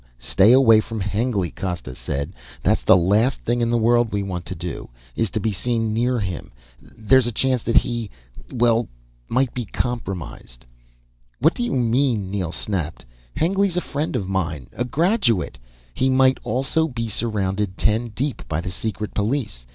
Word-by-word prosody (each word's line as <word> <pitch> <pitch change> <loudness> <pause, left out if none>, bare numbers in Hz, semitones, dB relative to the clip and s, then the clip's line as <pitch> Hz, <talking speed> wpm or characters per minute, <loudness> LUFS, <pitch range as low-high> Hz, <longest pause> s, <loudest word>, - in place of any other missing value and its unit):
Stay 95 - +4
away 120 -4 +7
from 110 0 -4
Hengly," 100 -3 -1
Costa 90 -9 -4
said. 70 +6 -4 0.3
"The - - +4
last 105 +9 +2
thing 120 +1 0
in 115 - +1
the 120 - +2
world 120 0 +3
we 100 -1 -1
want 90 -3 -5
to - - -5
do, 85 +1 -6 0.3
is 115 -2 0
to 110 - -2
be 110 +1 0
seen 115 +2 -1
near 120 +2 +1
him. 95 -5 -4 0.3
There's 120 +3 +2
a - - -1
chance 130 +2 +1
that 115 +2 +1
he... 120 -3 +1 0.4
well... 120 -2 +2 0.4
might 130 0 +1
be 125 - -3
compromised." 95 - -5 0.7
"What 160 +7 +3
do - - -5
you 240 - -1
mean!" 120 -5 +1
Neel 95 -5 -2
snapped. 85 -5 -4 0.3
"Hengly's 190 +2 +1
a - - +2
friend 150 0 -3
of 95 - -1
mine, 80 -9 -2
a 120 - -2
graduate 140 - +1 0.2
" - - -31
"He 130 - +1
might 130 0 +4
also 135 +7 +1
be 115 -5 -4
surrounded 100 -3 -1
ten 110 +2 +1
deep 130 +5 -3
by 80 - -1
the 90 +2 -4
secret 105 +2 -4
police. 105 - -2
115 Hz, 170 wpm, -22 LUFS, 95-125 Hz, 0.7 s, away